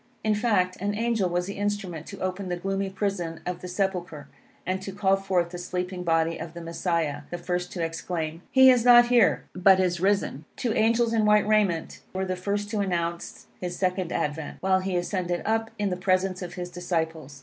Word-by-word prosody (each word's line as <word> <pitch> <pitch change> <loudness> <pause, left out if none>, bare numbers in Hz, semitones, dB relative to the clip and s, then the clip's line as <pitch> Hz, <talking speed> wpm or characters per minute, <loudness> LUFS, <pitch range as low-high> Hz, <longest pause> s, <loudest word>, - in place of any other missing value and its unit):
In 215 - +2
fact, 205 -5 +1
an 205 +1 -1
angel 225 -4 +1
was 175 +1 0
the 200 +1 -6
instrument 200 -6 -3
to 200 - -8
open 185 0 -3
the 175 - -1
gloomy 195 +2 -2
prison 190 -5 -3
of 180 0 -4
the 180 - -6
sepulchre, 180 -5 -2 0.4
and 185 +1 -1
to 195 - -6
call 195 0 +2
forth 185 -3 0
the 175 - -6
sleeping 180 +1 -4
body 165 -1 +1
of 165 +1 -7
the 170 - -6
Messiah, 165 -3 -1
the 175 - -4
first 180 0 -3
to 175 - -2
exclaim, 165 0 -3
"He 260 -1 +7
is 245 -2 +3
not 240 0 +7
here, 240 -4 +4
but 185 +1 +5
is 180 -2 +1
risen." 190 -6 0
Two 235 -3 -1
angels 230 +1 +2
in 225 -1 +2
white 210 0 +4
raiment, 205 -6 +1 0.2
were 190 0 -1
the 185 0 -2
first 200 +3 -2
to 215 - -1
announce 170 -3 -2
his 175 -1 -4
second 185 -2 -1
advent, 150 -1 -3
while 190 0 +2
he 185 0 -2
ascended 175 -1 -2
up 225 +1 0
in 205 -2 -1
the - - 0
presence 185 0 +1
of 180 - -6
his 180 -1 -5
disciples. 160 -5 -3
185 Hz, 205 wpm, -26 LUFS, 175-200 Hz, 0.4 s, He